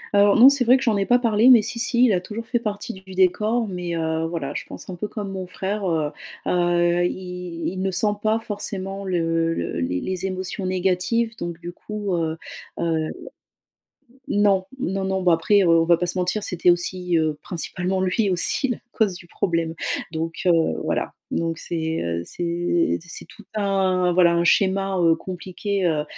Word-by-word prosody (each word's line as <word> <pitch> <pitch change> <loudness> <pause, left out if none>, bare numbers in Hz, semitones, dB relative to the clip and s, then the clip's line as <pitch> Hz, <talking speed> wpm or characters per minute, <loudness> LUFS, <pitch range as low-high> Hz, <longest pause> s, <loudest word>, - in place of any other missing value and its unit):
Alors 200 0 +5
non 240 +3 +9
c'est 280 -2 +3
vrai 250 +2 +6
que 265 - -4
j'en 225 -5 +2
ai 195 -1 0
pas 245 - +5
parlé 230 0 +4
mais 235 -4 +8
si, 230 +2 -2
si, 245 0 +3
il 220 - +3
a 180 - +1
toujours 225 +4 -7
fait 240 +1 0
partie 215 +1 -4
du 190 0 -12
décor 215 +5 +2
mais, 180 -2 -4
heu, 160 0 -1
voilà, 160 -4 -4
je - - -4
pense - - -10
un 185 - -6
peu 195 +4 -4
comme 205 -2 -6
mon 185 -1 -5
frère, 195 +2 -3
heu 155 -3 0 0.3
heu, 175 0 +2
il 180 -2 -6
il 185 - -4
ne 195 - 0
sent 205 +3 +1
pas 215 +1 +2
forcément 200 -2 -5
le 165 -2 0
le 85 0 -3
les 90 +1 -1
les 185 0 -3
émotions 185 0 -4
négatives, 190 +5 0
donc 170 -1 -5
du 175 0 -7
coup, 210 -2 -5
heu 160 -1 -1 0.4
heu 160 -2 0 1.2
non. 200 -2 +2
Non, 195 -1 -2
non. 190 0 -1
Bon 180 -2 +3
après, 195 +5 +3
heu, 175 - +2
on 165 0 +5
va 170 +1 +5
pas 180 - -1
se 180 - -1
mentir, 180 +4 0
c'était 180 -1 +1
aussi, 175 0 0
heu, 155 -2 0
principalement 180 +3 -2
lui 190 +3 +1
aussi 185 +9 +4
la 245 - -1
cause 215 -4 +1
du 175 - -11
problème. 165 -2 -1 0.4
Donc, 165 0 -4
heu, 180 - +5 0.3
voilà, - - -2 0.2
donc 165 -1 -1
c'est, 160 -1 -3
heu, 85 0 -2
c'est 175 - 0
c'est 170 - -15
c'est - - -6
tout 215 - -15
un 190 -3 +1
voilà 175 -1 +4
un 170 0 +2
schéma, 195 +1 +2
heu, 165 -1 +4
compliqué, 185 +3 -4
heu, 155 -2 0
185 Hz, 195 wpm, -23 LUFS, 170-205 Hz, 1.2 s, non